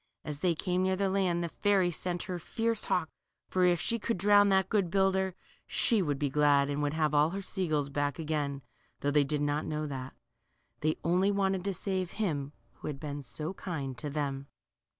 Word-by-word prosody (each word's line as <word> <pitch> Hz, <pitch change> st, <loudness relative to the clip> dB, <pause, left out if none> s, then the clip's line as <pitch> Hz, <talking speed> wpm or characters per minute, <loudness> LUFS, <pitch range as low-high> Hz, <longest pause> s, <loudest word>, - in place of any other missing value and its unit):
As 150 Hz, -1 st, -4 dB
they 175 Hz, 0 st, +2 dB
came 180 Hz, +2 st, 0 dB
near 190 Hz, 0 st, +2 dB
the 195 Hz, 0 st, 0 dB
land, 180 Hz, -3 st, +1 dB
the -, -, -1 dB
fairy 195 Hz, -1 st, +2 dB
sent 175 Hz, +1 st, -2 dB
out -, -, -8 dB
her 180 Hz, -3 st, -4 dB
fierce 225 Hz, +5 st, -1 dB
hawk, 165 Hz, -3 st, 0 dB, 0.4 s
for 185 Hz, -1 st, +3 dB
if 175 Hz, -1 st, +3 dB
she 230 Hz, -, 0 dB
could 230 Hz, 0 st, -1 dB
drown 205 Hz, +2 st, +5 dB
that 190 Hz, -1 st, +3 dB
good 195 Hz, -4 st, +1 dB
builder, 190 Hz, 0 st, +2 dB, 0.3 s
she 225 Hz, -5 st, +3 dB
would 145 Hz, -6 st, 0 dB
be 145 Hz, -, 0 dB
glad, 145 Hz, 0 st, +3 dB
and 145 Hz, +1 st, -1 dB
would 145 Hz, +1 st, 0 dB
have 155 Hz, -2 st, +1 dB
all 150 Hz, +1 st, +4 dB
her 195 Hz, +3 st, -4 dB
sea 190 Hz, -1 st, -2 dB
gulls 145 Hz, -3 st, 0 dB
back 145 Hz, 0 st, -1 dB
again, 150 Hz, -3 st, -2 dB, 0.4 s
though 145 Hz, -, +1 dB
they 145 Hz, 0 st, +4 dB
did 145 Hz, +1 st, -1 dB
not 145 Hz, +1 st, 0 dB
know 155 Hz, 0 st, -2 dB
that. 135 Hz, -3 st, -6 dB, 0.6 s
They 155 Hz, +3 st, 0 dB
only 180 Hz, +4 st, +3 dB
wanted 195 Hz, -2 st, +1 dB
to 200 Hz, -, 0 dB
save 185 Hz, -1 st, -2 dB
him 145 Hz, -10 st, -2 dB, 0.3 s
who -, -, -7 dB
had 145 Hz, -2 st, -4 dB
been 145 Hz, -1 st, -5 dB
so 140 Hz, +7 st, -5 dB
kind 145 Hz, -9 st, -4 dB
to 150 Hz, -, -4 dB
them. 140 Hz, -2 st, -3 dB
165 Hz, 210 wpm, -31 LUFS, 145-190 Hz, 0.6 s, drown